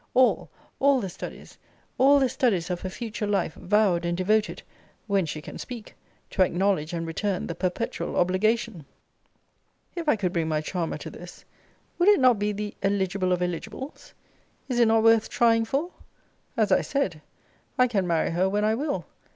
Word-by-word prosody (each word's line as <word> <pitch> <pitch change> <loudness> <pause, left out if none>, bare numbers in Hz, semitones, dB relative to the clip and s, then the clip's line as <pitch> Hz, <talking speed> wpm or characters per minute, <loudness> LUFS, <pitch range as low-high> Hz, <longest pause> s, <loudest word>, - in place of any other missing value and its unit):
All 255 0 +3 0.3
all 280 -1 +4
the 195 -5 -4
studies 175 - -9 0.4
all 280 +2 +6
the 270 -2 +3
studies 195 -9 0
of 175 - -3
her 185 - -4
future 215 +1 -4
life 200 -5 0
vowed 190 -2 +2
and 170 0 -1
devoted 210 +3 +1 0.4
(when 200 -5 +1
she 155 0 -5
can - - -9
speak) 240 -4 -8 0.4
to 195 - 0
acknowledge 180 -3 +1
and 165 -1 -3
return 180 +4 -2
the - - -4
perpetual 185 +6 -3
obligation! 200 0 +1 1.1
If 335 -3 -2
I 295 - +5
could 190 -4 -2
bring 165 -2 0
my 155 -1 0
charmer 165 +2 -3
to - - -8
this, - - -12 0.5
would 350 +4 +5
it 415 - +6
not 250 -5 +5
be 205 0 0
the 210 0 -4
eligible 195 -1 0
of 180 0 +1
eligibles? 180 - -6 0.5
Is 250 -2 -1
it 235 - +5
not 225 0 +3
worth 225 -1 +4
trying 230 -2 +3
for? 285 +9 -2 0.7
As 215 -3 +2
I - - +5
said, 190 - -2 0.6
I 250 - +6
can 200 -6 0
marry 165 -2 +1
her 180 +3 +1
when 205 +2 0
I 215 - +3
will. 285 +5 -2
205 Hz, 175 wpm, -26 LUFS, 180-235 Hz, 1.1 s, all